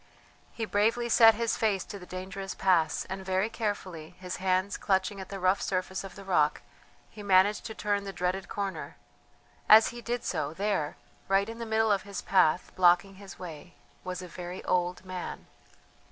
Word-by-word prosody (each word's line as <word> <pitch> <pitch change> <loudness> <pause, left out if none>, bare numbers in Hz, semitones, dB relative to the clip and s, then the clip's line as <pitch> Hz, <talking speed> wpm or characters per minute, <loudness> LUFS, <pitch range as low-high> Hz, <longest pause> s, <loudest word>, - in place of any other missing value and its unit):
He 225 - -4
bravely 225 +4 +1
set 225 -1 +7
his 230 0 0
face 205 -4 +1
to 200 - -8
the 180 - -12
dangerous 190 +1 -6
pass, 170 -5 +2
and 190 0 -6
very 190 +3 0
carefully, 185 -7 -4
his 185 -1 -5
hands 185 +1 0
clutching 195 0 0
at 190 - -9
the 195 - -6
rough 185 +2 +2
surface 190 0 -2
of 195 -2 -9
the 200 - -10
rock, 155 -6 +1 0.5
he 210 - -10
managed 200 +1 +3
to 220 - -8
turn 205 -1 -1
the 200 - -5
dreaded 180 +1 -2
corner; 200 -2 -4 0.7
as 220 +1 +8
he 240 0 -9
did 240 +1 -3
so, 145 +2 -2
there, 195 -6 -1 0.3
right 195 +1 +2
in 230 +1 -7
the 230 - -5
middle 220 0 +2
of 200 -2 +2
his 200 -1 -7
path, 180 -3 +3
blocking 180 +2 +4
his 200 -1 -11
way, 175 0 -9 0.3
was 185 0 -5
a - - -7
very 180 +1 -7
old 180 +1 0
man. 185 -1 -6
190 Hz, 180 wpm, -29 LUFS, 185-205 Hz, 0.7 s, as